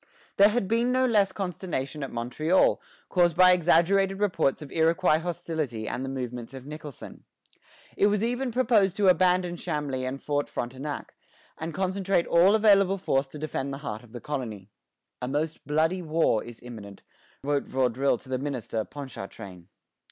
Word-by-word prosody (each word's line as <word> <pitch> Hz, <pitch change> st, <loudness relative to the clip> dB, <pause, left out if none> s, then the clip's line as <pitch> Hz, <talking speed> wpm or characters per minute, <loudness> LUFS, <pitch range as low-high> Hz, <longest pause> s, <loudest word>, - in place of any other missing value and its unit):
There 200 Hz, +1 st, +7 dB
had 215 Hz, -2 st, -1 dB
been 230 Hz, +4 st, +1 dB
no 255 Hz, 0 st, +3 dB
less 205 Hz, -5 st, +3 dB
consternation 170 Hz, -7 st, -4 dB
at 135 Hz, -, -3 dB
Montreal, 140 Hz, +10 st, +1 dB, 0.3 s
caused 175 Hz, -3 st, +2 dB
by 185 Hz, 0 st, +8 dB
exaggerated 180 Hz, +3 st, +3 dB
reports 165 Hz, -8 st, +1 dB
of 140 Hz, -, -11 dB
Iroquois 165 Hz, 0 st, +3 dB
hostility 160 Hz, -9 st, -4 dB
and 125 Hz, -, -3 dB
the 135 Hz, -, -4 dB
movements 125 Hz, -1 st, -5 dB
of 130 Hz, -1 st, -9 dB
Nicholson. 150 Hz, -2 st, -9 dB, 0.7 s
It 200 Hz, -, +4 dB
was 210 Hz, 0 st, +1 dB
even 245 Hz, +3 st, -1 dB
proposed 220 Hz, -6 st, +3 dB
to 200 Hz, -2 st, +4 dB
abandon 180 Hz, -1 st, +3 dB
Chambly 145 Hz, -6 st, -3 dB
and 130 Hz, +2 st, -4 dB
Fort 145 Hz, 0 st, -2 dB
Frontenac, 130 Hz, +4 st, -5 dB, 0.4 s
and 160 Hz, +1 st, -5 dB
concentrate 190 Hz, +1 st, 0 dB
all 180 Hz, +5 st, +5 dB
available 200 Hz, -3 st, +4 dB
force 135 Hz, -7 st, 0 dB
to 145 Hz, -, -10 dB
defend 140 Hz, -2 st, -3 dB
the 135 Hz, -, -4 dB
heart 110 Hz, -2 st, -4 dB
of 120 Hz, -3 st, -18 dB
the 120 Hz, -, -7 dB
colony. 110 Hz, -9 st, -5 dB, 0.5 s
"A 125 Hz, -, -2 dB
most 150 Hz, +2 st, -3 dB
bloody 160 Hz, +5 st, +1 dB
war 160 Hz, -9 st, +1 dB
is 120 Hz, -1 st, -11 dB
imminent," 105 Hz, -5 st, -10 dB, 0.4 s
wrote 145 Hz, 0 st, 0 dB
Vaudreuil 130 Hz, 0 st, +1 dB
to 130 Hz, -, -16 dB
the 130 Hz, -1 st, -1 dB
minister, 125 Hz, -5 st, -3 dB
Ponchartrain. 100 Hz, -10 st, -9 dB
155 Hz, 160 wpm, -27 LUFS, 130-185 Hz, 0.7 s, by